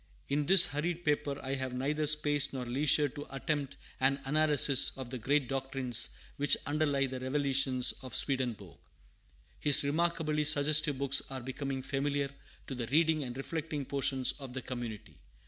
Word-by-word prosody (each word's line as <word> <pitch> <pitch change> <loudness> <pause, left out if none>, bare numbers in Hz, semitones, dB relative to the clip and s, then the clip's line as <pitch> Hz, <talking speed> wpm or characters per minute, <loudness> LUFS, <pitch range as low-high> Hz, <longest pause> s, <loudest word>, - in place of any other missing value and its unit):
In 145 +1 0
this 190 -1 +7
hurried 170 +2 -3
paper 145 -2 0
I 135 0 -3
have 130 -2 -3
neither 150 +4 -1
space 145 -1 +2
nor 130 -2 -4
leisure 145 +4 +2
to 145 +3 -9
attempt 140 0 -3 0.2
an 135 +1 +2
analysis 145 -2 +3
of 130 -2 -7
the 130 - -5
great 140 +3 +1
doctrines 135 -2 0 0.3
which 145 0 +3
underlie 145 -2 +1
the 130 -1 -5
"revelations" 130 -1 +2
of 130 -3 -7
Swedenborg. 130 -5 -1 0.8
His 145 -1 +6
remarkably 155 0 0
suggestive 150 0 +2
books 140 0 +2
are 130 -1 -5
becoming 135 +1 -5
familiar 140 0 -2 0.3
to - - -6
the 120 -3 -4
reading 155 +3 +2
and 125 -1 -7
reflecting 150 0 -4
portion 135 -1 -1 0.2
of 135 -3 -8
the 130 - -4
community. 120 -4 -7
140 Hz, 155 wpm, -31 LUFS, 130-150 Hz, 0.8 s, this